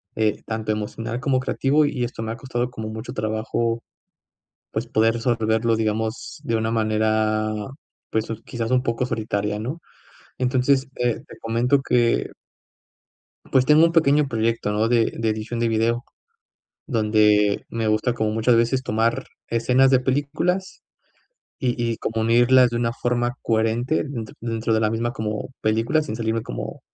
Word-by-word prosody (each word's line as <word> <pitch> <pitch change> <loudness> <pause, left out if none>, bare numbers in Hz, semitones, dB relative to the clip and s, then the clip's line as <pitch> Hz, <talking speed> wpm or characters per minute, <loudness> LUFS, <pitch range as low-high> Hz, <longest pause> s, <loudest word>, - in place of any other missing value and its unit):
eh, 110 -1 0
tanto 110 -1 -2
emocional 115 +3 -4
como 135 -2 +1
creativo, 140 +3 +2
y 135 -4 -1
esto 120 -2 -4
me 110 - -3
ha - - -7
costado 120 0 -2
como 110 -3 -6
mucho 110 +2 -6
trabajo, 110 +2 -1 0.9
pues, - - -2
poder 115 +1 +2
resolverlo, 115 -1 +1
digamos, 110 +1 -2
de 115 - -1
una 110 0 0
manera, 110 -1 +1 0.6
pues, 110 0 0 0.2
quizás 115 -2 -4
un 125 0 +3
poco 115 0 -1
solitaria, 105 -3 -2
¿no? 130 +10 -4 0.6
Entonces, 130 +1 +2
eh, 120 -1 0
te - - -12
comento 120 +5 +2
que 120 -3 +2 1.2
pues, 130 -1 +4
tengo 150 +3 +6
un 165 - +2
pequeño 150 -3 +3
proyecto, 115 -2 0
¿no?, 105 +2 +1
de 115 -1 +2
de 115 -1 0
edición 110 +2 -3
de 115 - +2
video, 115 +2 0 0.8
donde 105 -4 +3
me 115 -1 -2
gusta 110 +3 +1
como 110 -2 -1
muchas 115 +2 +3
veces 120 +3 +2
tomar 115 +1 0 0.2
escenas 125 +3 +3
de 130 - +5
películas, 145 +8 -1 0.8
y 125 -2 0 0.2
y - - -4
como 110 0 -2
unirlas 120 +2 +5
de 120 - -3
una 115 0 0
forma 120 0 -1
coherente 115 +6 +1
dentro 120 -7 -6
dentro 115 -1 -1
de 110 - +2
la 110 -1 +2
misma 115 +1 -1
como 110 -4 -4
película, 115 +8 +1
sin 110 - -5
salirme 115 -1 -1
como - - -6
115 Hz, 155 wpm, -23 LUFS, 110-125 Hz, 1.2 s, tengo